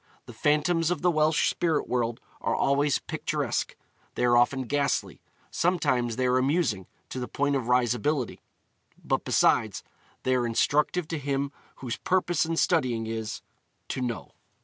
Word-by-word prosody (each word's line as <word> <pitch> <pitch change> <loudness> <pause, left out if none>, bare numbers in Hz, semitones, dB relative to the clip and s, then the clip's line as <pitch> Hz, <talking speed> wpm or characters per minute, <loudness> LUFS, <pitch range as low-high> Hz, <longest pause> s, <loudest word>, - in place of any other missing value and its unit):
The - - -11
phantoms 160 +3 +2
of 175 -3 -2
the 180 - +4
Welsh 155 0 +2
spirit 165 -3 0
world 120 -2 -1 0.2
are - - 0
always 140 +1 +2
picturesque; - - -2 0.4
they - - +1
are 120 0 +4
often 125 +2 +3
ghastly; 140 +2 -1 0.3
sometimes 135 -10 +1
they 130 - 0
are 125 0 +3
amusing 130 - 0 0.2
to 130 - -5
the 125 - -4
point 145 0 0
of 130 -4 -2
risibility; 125 +2 +1 0.6
but - - 0
besides, - - +2 0.4
they 130 - +2
are 125 -2 +1
instructive 150 +8 +1
to 165 - -2
him 140 0 -1 0.2
whose 125 -3 -5
purpose 175 -3 +1
in 165 - -1
studying 125 -12 +1
is, 110 -1 -4 0.5
to - - -3
know. 120 -2 -4
135 Hz, 150 wpm, -27 LUFS, 120-155 Hz, 0.6 s, the